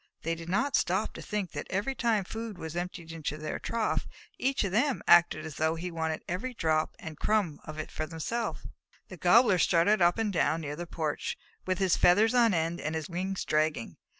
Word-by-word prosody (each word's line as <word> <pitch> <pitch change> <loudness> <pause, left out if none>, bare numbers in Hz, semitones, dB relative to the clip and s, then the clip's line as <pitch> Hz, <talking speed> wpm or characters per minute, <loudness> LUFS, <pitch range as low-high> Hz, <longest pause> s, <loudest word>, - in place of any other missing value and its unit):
They 165 - 0
did 165 0 -7
not 270 +10 +1
stop - - +1
to - - -8
think 205 -4 -3
that 145 - -5
every 205 +8 -1
time 230 -6 +1
food 225 +1 -6
was 160 0 -6
emptied 175 -1 -5
into 155 -2 -4
their 155 0 -4
trough, 230 -2 -1 0.3
each 270 0 +1
of 195 - -2
them 250 +6 +1
acted 170 -2 +5
as 155 -2 -7
though 160 +1 +1
he 175 +2 -5
wanted 160 -1 -2
every 245 +9 -3
drop 155 -4 0
and 160 -8 -9
crumb 205 -8 +1
of 155 0 -8
it 155 - -5
for 155 - -4
himself. 195 +9 -3 0.4
The 185 - -9
Gobbler 195 +2 +5
strutted 180 +5 +3
up 175 0 +4
and 220 -3 0
down 165 -1 +1
near 145 -1 -4
the 175 +2 -6
porch, 155 -3 -3 0.3
with 185 -1 +1
his 190 -2 +2
feathers 210 +6 +5
on 235 -2 +5
end 165 -1 -1
and 155 +1 -2
his 160 +1 -4
wings 185 +2 -3
dragging. 155 -5 0
175 Hz, 205 wpm, -29 LUFS, 160-210 Hz, 0.4 s, acted